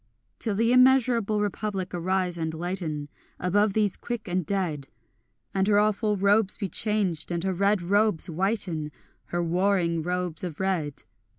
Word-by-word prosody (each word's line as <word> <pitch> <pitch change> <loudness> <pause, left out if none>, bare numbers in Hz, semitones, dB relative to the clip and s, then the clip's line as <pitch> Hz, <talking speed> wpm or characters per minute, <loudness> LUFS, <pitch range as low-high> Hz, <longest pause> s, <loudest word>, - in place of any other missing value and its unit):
Till 215 -3 -2
the 230 +3 +2
immeasurable 250 -5 +4
Republic 205 -2 -3
arise 180 0 -1
and 160 -1 -3
lighten 165 -4 -3 0.3
Above 200 +3 +1
these 210 -2 +1
quick 235 -3 -6
and 180 0 -1
dead, 165 -7 -2 0.7
And 190 0 +1
her 205 -1 +4
awful 210 0 +1
robes 200 +1 +3
be 195 - -3
changed, 200 -7 -1
and 170 0 -2
her 190 0 0
red 200 +1 +1
robes 205 -1 +4
whiten, 175 -3 -1 0.3
Her 175 0 -2
warring 175 -1 +1
robes 180 -1 -3
of 175 -5 -5
red. 175 -7 -2
190 Hz, 150 wpm, -26 LUFS, 175-210 Hz, 0.7 s, immeasurable